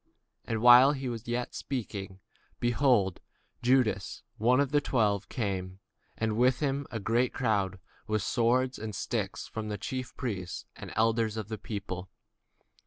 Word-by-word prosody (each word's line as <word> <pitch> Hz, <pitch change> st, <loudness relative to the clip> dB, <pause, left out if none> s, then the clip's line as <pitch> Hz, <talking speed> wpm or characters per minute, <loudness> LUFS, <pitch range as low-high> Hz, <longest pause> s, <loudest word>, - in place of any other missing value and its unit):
And 115 Hz, -1 st, -2 dB
while 125 Hz, +3 st, +9 dB
he 130 Hz, -4 st, -3 dB
yet 120 Hz, +1 st, -2 dB
spake, 110 Hz, -7 st, -4 dB, 0.5 s
lo, 120 Hz, -5 st, +3 dB, 0.5 s
Judas, 120 Hz, -6 st, +1 dB, 0.2 s
one 125 Hz, +4 st, +4 dB
of 140 Hz, -1 st, +1 dB
the 145 Hz, 0 st, +3 dB
twelve, 105 Hz, -6 st, +1 dB
came, 95 Hz, -5 st, -3 dB, 0.4 s
and 110 Hz, -1 st, 0 dB
with 125 Hz, +1 st, +3 dB
him 140 Hz, -1 st, -1 dB
a 115 Hz, -, -4 dB
great 120 Hz, +5 st, 0 dB
multitude 100 Hz, -6 st, +1 dB, 0.3 s
with 110 Hz, -2 st, 0 dB
swords 125 Hz, +3 st, +1 dB
and 110 Hz, -2 st, -5 dB
staves, -, -, -3 dB
from 110 Hz, -1 st, -5 dB
the 105 Hz, -, -3 dB
chief 130 Hz, +5 st, -5 dB
priests 95 Hz, -8 st, -4 dB
and -, -, -9 dB
elders 110 Hz, 0 st, +2 dB
of 110 Hz, -2 st, -4 dB
the 110 Hz, -2 st, -4 dB
people. 95 Hz, -3 st, -5 dB
115 Hz, 145 wpm, -30 LUFS, 105-125 Hz, 0.5 s, while